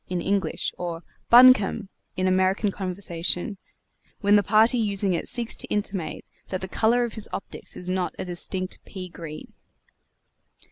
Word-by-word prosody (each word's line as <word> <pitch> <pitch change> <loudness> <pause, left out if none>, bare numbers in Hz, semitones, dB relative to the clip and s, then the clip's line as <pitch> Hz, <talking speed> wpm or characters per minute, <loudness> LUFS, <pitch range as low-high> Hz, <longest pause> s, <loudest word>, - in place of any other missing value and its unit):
in 180 -1 -1
English, 190 -2 -1
or 170 -1 -4 0.3
"Buncombe!" 235 -4 +6 0.3
in 185 - 0
American 190 +2 +2
conversation, 185 0 -2 0.6
when 205 0 +4
the 205 - +6
party 220 +5 +4
using 200 -3 +1
it 170 - -2
seeks 235 -2 +1
to - - -8
intimate 195 -6 -3 0.2
that 185 - -3
the 190 - -4
color 230 +5 +2
of 235 -2 -3
his 220 - -4
optics - - -6
is 180 - -8
not 185 -1 -1
a - - -4
distinct 185 +1 -3
pea 185 -2 -8
green! 160 -3 -9
190 Hz, 150 wpm, -25 LUFS, 180-210 Hz, 0.6 s, Buncombe